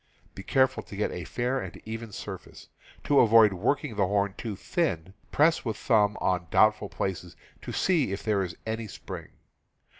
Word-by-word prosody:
Be - - -8
careful 130 +5 +2
to - - -11
get 105 - -1
a 90 - -6
fair 125 +2 -1
and 95 -7 -7
even 110 0 -6
surface. - - -9 0.3
To 145 - +4
avoid 110 -3 +6
work 120 +10 0
ing 110 - -5
the 100 -2 +2
horn 100 0 +1
too 110 -4 -5
thin, 95 - -2 0.2
press 160 +3 +3
with 110 -4 -3
thumb 105 -2 +2
on 90 -2 0
doubtful 105 0 +3
places 90 -2 -4 0.3
to - - -6
see 160 - +1
if 100 - -4
there 105 -3 +1
is 90 -3 -4
any 110 0 -3
spring. - - -8
105 Hz, 180 wpm, -27 LUFS, 95-120 Hz, 0.3 s, avoid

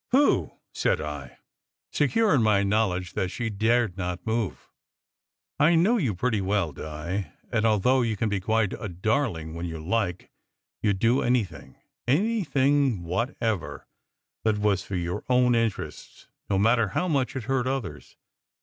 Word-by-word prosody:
"Pooh!" 250 - +3 0.2
said - - +1
I, 75 -3 -6 0.5
secure 210 - +2
in 135 - +4
my 105 -2 +3
knowledge 100 -3 0
that 95 - -1
she 110 +2 -3
dared 110 -1 +1
not 90 +1 -4
move. 110 -3 -2 0.9
"I 155 +4 +5
know 195 +9 +4
you 120 - 0
pretty 110 +1 0
well, 95 -4 0
Di, 80 +7 -5 0.2
and 115 -2 +1
although 120 +5 +3
you 115 -3 -1
can 110 - 0
be 100 -2 0
quite 110 +1 +1
a 110 - -5
darling 90 - -1
when 85 +1 -4
you 80 -1 -5
like, 90 +2 -2 0.5
you 105 -2 +2
d - - -4
do 115 +6 +3
anything 120 -5 -1 0.3
anything 145 - +2
whatever, 110 +2 -2 0.6
that 110 -1 +2
was 105 -2 +1
for 95 +1 -6
your 90 +3 -3
own 125 -1 +4
interests, 115 -3 -3 0.2
no 100 - +2
matter 115 +2 +3
how 180 - -1
much 140 -7 0
it 130 - -3
hurt 130 +1 0
others. 135 -4 -4
110 Hz, 155 wpm, -26 LUFS, 95-125 Hz, 0.9 s, I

